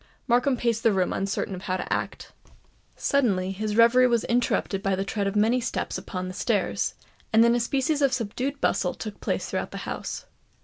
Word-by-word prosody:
Markham 250 +2 +3
paced 230 -2 0
the 225 - +4
room 185 -2 +1
uncertain 195 -1 -2
how 185 -1 -2
to - - -3
act. - - -4 0.6
Suddenly 195 -9 +1
his 210 +2 -3
reverie 235 +2 +6
was 235 -2 +2
interrupted 235 -4 0
by 195 -1 +1
the 195 +1 -2
tread 200 -1 -1
of 195 - -2
many 225 +4 +3
steps 245 - -3
upon 185 -1 -4
the 185 - -6
stairs; - - 0 0.4
and 225 +1 +6
then 235 0 +5
a 240 - +2
species 275 +5 0
of 275 -2 +4
subdued 255 +4 -2
bustle 180 - +1
took 215 -2 -7
place - - -1
throughout - - -3
the - - -7
house. - - -5
225 Hz, 190 wpm, -26 LUFS, 195-250 Hz, 0.6 s, reverie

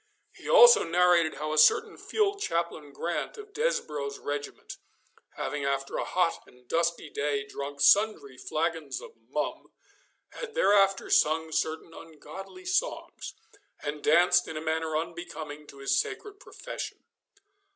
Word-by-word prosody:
He - - -10
also 485 -1 +8
narrated 175 -1 +3
how 155 0 -3
a 155 - +3
certain 155 - +5
field 410 -2 -1
chaplain 165 - -2
Grant, 170 - -4
of 420 -1 -11
Desborough's 150 - -2
regiment, 145 0 -6 0.6
having 145 +1 -3
after 140 0 -2
a - - -1
hot - - 0
and 125 0 -21
dusty 170 +1 0
day 140 -1 -1
drunk 140 0 -7
sundry 145 -3 +4
flagons 160 +2 -3
of 485 - -11 0.2
mum, - - -3 0.6
had 460 -2 -8
thereafter 195 -1 +3
sung 160 +1 +3
certain 160 +1 -2
ungodly 165 - -11
songs, 405 +7 -2 0.5
and 150 0 -4
danced 175 +3 +4
in 160 - -6
a - - -2
manner 160 0 -1
unbecoming 155 -2 -6
to 140 - -13
his 135 0 +1
sacred 410 -1 -5
profession. - - -8
160 Hz, 135 wpm, -28 LUFS, 145-195 Hz, 0.6 s, also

